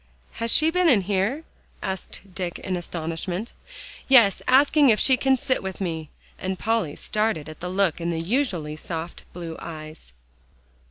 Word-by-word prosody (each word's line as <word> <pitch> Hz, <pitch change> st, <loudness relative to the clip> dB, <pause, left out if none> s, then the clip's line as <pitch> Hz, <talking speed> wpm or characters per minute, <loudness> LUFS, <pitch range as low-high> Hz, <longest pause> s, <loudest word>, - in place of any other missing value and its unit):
"Has 230 Hz, 0 st, -3 dB
she 315 Hz, +2 st, +4 dB
been 360 Hz, 0 st, +3 dB
in 230 Hz, -8 st, +5 dB
here?" 200 Hz, -, 0 dB, 0.4 s
asked 190 Hz, -1 st, -5 dB
Dick 180 Hz, -2 st, -3 dB
in 185 Hz, -, -3 dB
astonishment. 175 Hz, +4 st, -4 dB, 0.5 s
"Yes; 235 Hz, -8 st, +6 dB
asking 285 Hz, +2 st, +5 dB
if 215 Hz, -3 st, +4 dB
she 265 Hz, -, +5 dB
can 265 Hz, +1 st, +2 dB
sit 255 Hz, +1 st, -1 dB
with 190 Hz, -1 st, -5 dB
me," 160 Hz, -5 st, -3 dB, 0.3 s
and 190 Hz, 0 st, -3 dB
Polly 220 Hz, -9 st, 0 dB
started 210 Hz, -8 st, -1 dB
at 155 Hz, -, -10 dB
the 180 Hz, -, -4 dB
look 185 Hz, -2 st, +1 dB
in 170 Hz, -, -1 dB
the 165 Hz, -1 st, -1 dB
usually 175 Hz, -, -1 dB
soft 165 Hz, +2 st, -6 dB
blue 170 Hz, -2 st, -6 dB
eyes. 155 Hz, -, -9 dB
190 Hz, 160 wpm, -24 LUFS, 165-235 Hz, 0.5 s, Yes